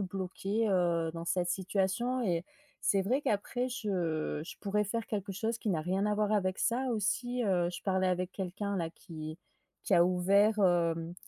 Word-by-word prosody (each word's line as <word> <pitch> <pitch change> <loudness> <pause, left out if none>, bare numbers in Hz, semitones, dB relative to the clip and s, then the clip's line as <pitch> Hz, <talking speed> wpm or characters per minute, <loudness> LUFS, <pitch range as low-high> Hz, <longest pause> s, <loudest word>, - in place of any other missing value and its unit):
bloquée, 195 +3 -2
heu, 170 -3 +2
dans 165 0 -5
cette 175 0 0
situation 195 +7 0
et 175 -5 0 0.4
c'est 195 - +2
vrai 250 +8 +1
qu'après 245 +1 0
je 175 - -2
je - - -9
pourrais 210 +1 0
faire 225 +2 -3
quelque 200 -2 -3
chose 220 +4 -1
qui 220 - -4
n'a 160 -4 0
rien 190 +4 0
à 210 - +1
voir 210 0 +1
avec 190 -3 +1
ça 250 +3 +1
aussi, 245 +3 0
heu. 180 -4 +2
Je - - -6
parlais 190 -1 +2
avec 180 0 -1
quelqu'un 200 +2 -3
là, 165 -3 -2
qui 155 -2 -8 0.5
qui - - +3
a 170 - +6
ouvert, 200 +4 +3
hem, 170 -3 +2
190 Hz, 180 wpm, -32 LUFS, 175-210 Hz, 0.5 s, a